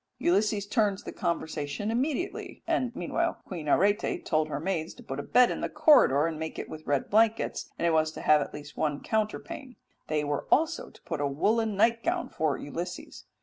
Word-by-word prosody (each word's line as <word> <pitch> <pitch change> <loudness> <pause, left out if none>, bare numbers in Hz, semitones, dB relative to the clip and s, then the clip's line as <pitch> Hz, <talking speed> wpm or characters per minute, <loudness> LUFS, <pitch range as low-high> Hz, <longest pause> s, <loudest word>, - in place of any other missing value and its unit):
Ulysses 200 +3 +1
turns 205 -2 +1
the - - -6
conversation 170 +2 -2
immediately, 285 - -2
and 330 -8 0
meanwhile 335 - -1
Queen 165 -5 -6
Arete 205 - +2
told 155 -1 +1
her 150 - -3
maids 165 -1 -2
to - - -13
put 135 +1 -5
a - - -1
bed 250 +10 +4
in - - -4
the - - -1
corridor, 285 - +5
and 165 -2 -3
make 160 0 -5
it - - -5
with 155 0 -10
red 140 -2 +1
blankets, 225 +1 +2
and - - -1
it 170 - +4
was 155 0 +2
to - - -7
have 150 -1 +5
at - - -4
least 145 0 -9
one 145 -2 -1
counterpane. 250 +5 -3 0.3
They 155 -1 0
were 145 -1 -2
also 325 +2 +2
to - - -20
put 165 -4 -3
a 145 - +1
woollen 215 +10 +1
nightgown 235 - +2
for 155 -3 0
Ulysses. 170 +5 -6
190 Hz, 195 wpm, -28 LUFS, 155-230 Hz, 0.3 s, corridor